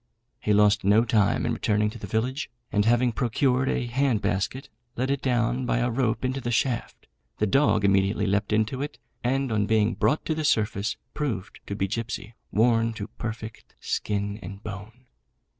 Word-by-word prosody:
He 105 - -1
lost 105 0 +4
no 105 +4 +4
time 110 -4 +2
in - - 0
returning 105 0 +1
to - - -10
the 100 - -6
village, 125 +9 -1 0.2
and 105 -1 +2
having 120 +2 +3
procured 125 +2 +1
a - - 0
hand 125 -1 +1
basket, 115 +9 -2 0.3
let 130 +3 0
it 140 - -1
down 125 0 +1
by 120 - +1
a 120 0 +1
rope 120 0 0
into 130 +1 -1
the 120 - -3
shaft; 120 0 -1 0.3
the 105 - +2
dog 105 -2 +3
immediately 100 +1 +2
leapt 100 +1 0
into 110 +5 +1
it, 145 -4 -4 0.3
and 135 +1 0
on 105 -2 +1
being 110 0 +3
brought 150 - +1
to 160 - 0
the 155 0 -2
surface, 110 -6 +1 0.2
proved 120 -10 -3
to 100 - -3
be 95 -1 0
Gipsy, 110 0 -4 0.2
worn 115 +1 +3
to 105 -2 -6
perfect 110 0 -7
skin 100 0 -2
and 100 +3 -9
bone. 110 +4 -8
115 Hz, 180 wpm, -26 LUFS, 105-125 Hz, 0.3 s, lost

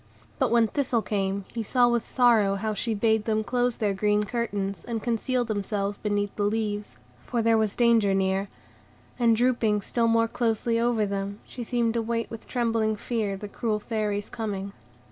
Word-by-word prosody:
But - - +2
when 235 -1 +4
Thistle 245 -2 0
came, 195 -1 -1
he 235 - -2
saw 245 +3 +3
with 240 -1 0
sorrow 225 -6 +4
how 215 +2 -2
she 220 +2 -1
bade 220 0 +2
them 220 -1 +1
close 245 +1 0
their 210 -3 0
green 210 +2 +2
curtains, 205 -3 -3
and 230 -2 -4
conceal 245 +1 0
themselves 205 -2 -2
beneath 205 -1 -1
the - - -3
leaves, 210 -1 -2 0.3
for 235 -2 0
there 225 0 +4
was 215 -2 +1
danger 230 -5 +4
near; 190 +1 0 0.7
and, 230 -2 +4
drooping 230 -3 +2
still 230 +3 0
more 230 0 +3
closely 230 0 0
over 235 -2 +2
them, 200 +1 -3
she 250 - -8
seemed 235 -1 0
to 235 - 0
wait 230 0 -2
with 225 - -8
trembling 225 -3 0
fear 210 -3 -2
the 210 - -7
cruel 215 +1 -2
Fairy's 210 -2 -2
coming. 200 -3 -4
220 Hz, 180 wpm, -26 LUFS, 205-235 Hz, 0.7 s, when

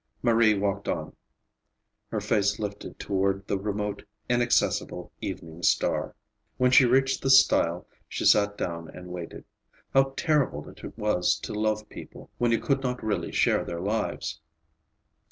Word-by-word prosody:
Marie 115 -3 +4
walked 100 0 -2
on, - - -3 0.9
her - - -3
face 105 0 +1
lifted 105 -1 -6
toward 95 0 -1
the 100 - -1
remote, 105 0 -3 0.3
inaccessible 120 0 0
evening 80 +1 -6
star. - - +1 0.4
When 125 0 +3
she 130 0 +7
reached 135 +2 +2
the 135 - -1
stile 90 -9 +4 0.2
she - - -3
sat 105 0 +4
down 85 -2 -4
and 90 0 -10
waited. 90 -2 -7 0.5
How 135 0 +3
terrible 145 - 0
it - - -15
was 105 -5 +1
to - - -6
love 110 0 -1
people - - -12
when 120 -1 +2
you 115 - +2
could 135 -1 0
not 125 -1 -3
really 100 -6 -2
share - - +2
their 85 - -5
lives! 95 -5 -3
105 Hz, 145 wpm, -27 LUFS, 95-120 Hz, 0.9 s, she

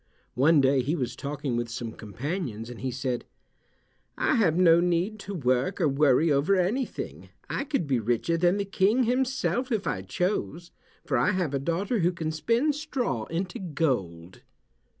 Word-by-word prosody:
One 145 +4 +4
day 135 0 +3
he 145 +7 -1
was 130 -7 -3
talking 140 -3 -3
with 120 0 -2
some 115 -1 -5
companions 115 - -5
and 120 - -10
he 130 - -1
said, 130 -1 -3 0.9
"I - - +2
have 190 -10 +3
no 170 -2 +6
need 180 +5 0
to 200 0 -6
work 130 +4 0
or 165 - +3
worry 145 +2 +3
over 145 +8 +3
anything. 205 +8 -2 0.2
I 275 - -2
could 275 - -1
be 135 -4 +1
richer 120 +9 0
than 175 +3 +2
the 200 - -1
King 200 +6 +2
himself 255 +1 0
if 215 -4 0
I 95 - -1
chose, 170 - -2 0.3
for - - 0
I - - +2
have 180 -6 -1
a 140 - 0
daughter 180 - -1
who 175 0 +2
can 160 -2 -3
spin 230 - +1
straw 260 - -2
into 180 +2 -4
gold." 110 - -2
165 Hz, 170 wpm, -27 LUFS, 130-195 Hz, 0.9 s, no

